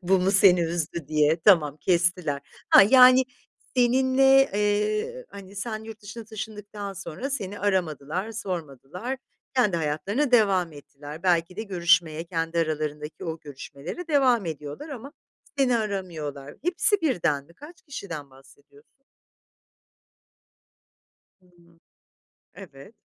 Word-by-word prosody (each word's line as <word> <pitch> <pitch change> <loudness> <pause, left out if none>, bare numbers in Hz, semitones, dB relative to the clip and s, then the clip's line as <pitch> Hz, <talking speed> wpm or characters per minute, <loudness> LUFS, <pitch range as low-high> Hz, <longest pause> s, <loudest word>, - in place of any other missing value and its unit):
bu 190 +2 +3
mu 185 +2 +1
seni 195 -3 +6
üzdü 165 -2 -3
diye. 155 +1 +2
Tamam, 155 -6 +4
kestiler. 170 -3 +1 0.3
Ha, - - +9
yani, 255 +3 +7 0.5
seninle, 265 +2 +4
eee, 210 - 0
hani, 200 0 -12
sen 220 +1 -4
yurt 220 -1 -10
dışına 220 +2 -9
taşındıktan 210 -2 -7
sonra 195 - -6
seni 205 -6 -4
aramadılar, 185 0 -1
sormadılar, 180 - -5 0.4
kendi 210 -9 +2
hayatlarına 195 - -1
devam 195 -7 +3
ettiler. 145 +1 -11
Belki 180 0 +1
de 220 - -3
görüşmeye, 170 -4 +1
kendi 165 -1 -3
aralarındaki 155 -1 -3
o 160 -1 -4
görüşmelere 145 - -8
devam 255 - +3
ediyorlar 150 - -7
ama 275 0 -8 0.5
seni 250 -3 +3
aramıyorlar. 165 -10 -5
Hepsi 360 +4 +1
birden 165 - 0
mi? 170 +4 -21
Kaç 320 +5 -14
kişiden 170 - -8
bahsediyorsun? 140 - -22 2.4
Hıı. 175 -2 -25 0.8
Evet. 140 +11 -13
185 Hz, 115 wpm, -25 LUFS, 155-225 Hz, 2.4 s, Ha